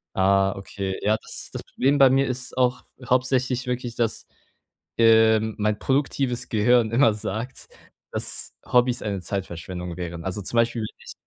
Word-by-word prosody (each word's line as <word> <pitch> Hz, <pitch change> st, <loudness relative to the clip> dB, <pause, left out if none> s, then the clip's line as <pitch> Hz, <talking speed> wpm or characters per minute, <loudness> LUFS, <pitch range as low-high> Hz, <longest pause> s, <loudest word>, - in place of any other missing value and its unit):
Ah, 95 Hz, 0 st, +3 dB
okay. 95 Hz, -1 st, -5 dB
Ja, 110 Hz, +1 st, +2 dB
das -, -, -6 dB
das -, -, -6 dB
Problem 140 Hz, +2 st, +1 dB
bei 135 Hz, -2 st, +7 dB
mir 135 Hz, +1 st, +3 dB
ist 125 Hz, 0 st, -4 dB
auch 125 Hz, -1 st, +1 dB, 0.3 s
hauptsächlich 125 Hz, 0 st, +1 dB
wirklich, 125 Hz, -1 st, -3 dB
dass, 115 Hz, -2 st, -2 dB, 0.7 s
ähm, 110 Hz, -1 st, +4 dB
mein 105 Hz, 0 st, 0 dB
produktives 135 Hz, -2 st, -1 dB
Gehirn 115 Hz, +1 st, +3 dB
immer 115 Hz, -2 st, +4 dB
sagt, 110 Hz, +5 st, -5 dB, 0.4 s
dass -, -, 0 dB
Hobbys 125 Hz, 0 st, +2 dB
eine 100 Hz, -3 st, -3 dB
Zeitverschwendung 90 Hz, -1 st, -5 dB
wären. 85 Hz, -1 st, -6 dB
Also, 95 Hz, +2 st, -3 dB
zum 110 Hz, -, -4 dB
Beispiel, 115 Hz, 0 st, +2 dB
wenn 110 Hz, -, -7 dB
ich -, -, -11 dB
115 Hz, 155 wpm, -24 LUFS, 100-125 Hz, 0.7 s, bei